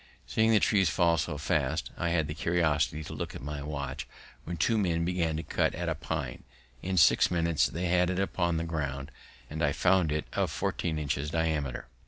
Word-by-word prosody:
Seeing 110 0 +2
the 110 -2 +5
trees 95 -5 +3
fall 85 -1 +3
so 75 -1 -2
fast, 75 -2 -1
I 85 - -1
had 85 -2 +1
the 75 - -4
curiosity 80 -2 +1
to - - -7
look - - -5
at - - -8
my 75 0 -4
watch 70 -2 -5 0.4
when 85 0 -4
two 115 +8 +2
men 85 -6 +1
began 85 -3 0
to 80 - -3
cut - - 0
at 85 -1 -2
a - - +1
pine; 75 - -4 0.4
in 95 0 -2
six 80 - +6
minutes 85 -6 +2
they 85 +9 -3
had 90 0 +3
it 95 - -1
upon 85 -3 0
the 80 - -1
ground, 70 -4 -3 0.4
and 80 +4 -4
I 70 - +2
found 90 -2 +3
it 75 0 -1
of - - +1
fourteen 80 -2 -2
inches 75 -1 -2
diameter. 75 -6 -1
80 Hz, 205 wpm, -29 LUFS, 75-85 Hz, 0.4 s, six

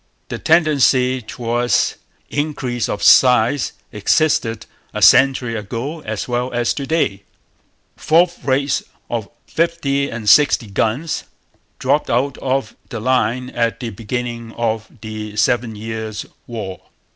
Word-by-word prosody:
The - - -4
tendency 135 -6 +3
towards 120 +1 0 0.3
increase 140 -5 -2
of 105 - -3
size 125 +1 +5 0.2
existed 115 0 +1 0.3
a - - -2
century 130 -3 +5
ago 115 +9 -4
as 110 -6 -4
well 125 +1 -1
as 120 -1 +1
to 140 -2 -5
day. 155 -12 0 0.8
'Fourth 170 +2 +2
rates,' 140 +1 +1 0.3
of 115 -4 -3 0.2
50 145 -4 0
and 115 -2 -6
60 120 -4 +5
guns, 120 +10 -1 0.5
dropped - - +1
out 130 +3 0
of 130 -4 -1
the 120 - -5
line 125 +1 0
at 115 -1 -1
the 120 -3 -4
beginning 115 +1 -5
of 110 -2 -2
the 105 -1 -6
Seven 115 +1 +1
Years' 110 0 -5 0.2
War. 100 -6 -6
120 Hz, 120 wpm, -19 LUFS, 110-140 Hz, 0.8 s, size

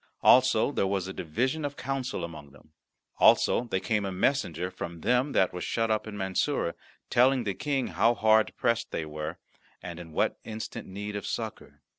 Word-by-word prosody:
Also 130 0 +5
there 100 - 0
was 95 -1 -1
a 95 - -5
division 125 - -1
of 145 -1 -3
counsel 135 -6 -3
among 75 -4 -8
them. 75 +2 -20 0.5
Also 120 - +5
there 95 -5 -1
came 105 0 0
a 100 - -2
messenger 90 - 0
from 85 -2 -7
them 125 - +2
that 95 - +3
were 90 - -5
shut 115 -1 0
up 110 0 0
in 105 -1 -6
Mansoura, 95 - 0 0.4
telling 130 +1 +4
the 100 -3 -1
King 135 +3 -1
how 115 +2 +3
hard 110 -1 +4
pressed 115 -1 0
they 80 - -3
were, 75 +2 -5 0.4
and 85 -1 -8
in 85 -2 -10
what - - 0
instant 110 0 -6
need 105 +2 -6
of 100 - -4
succour. - - -6
105 Hz, 185 wpm, -28 LUFS, 90-125 Hz, 0.5 s, Also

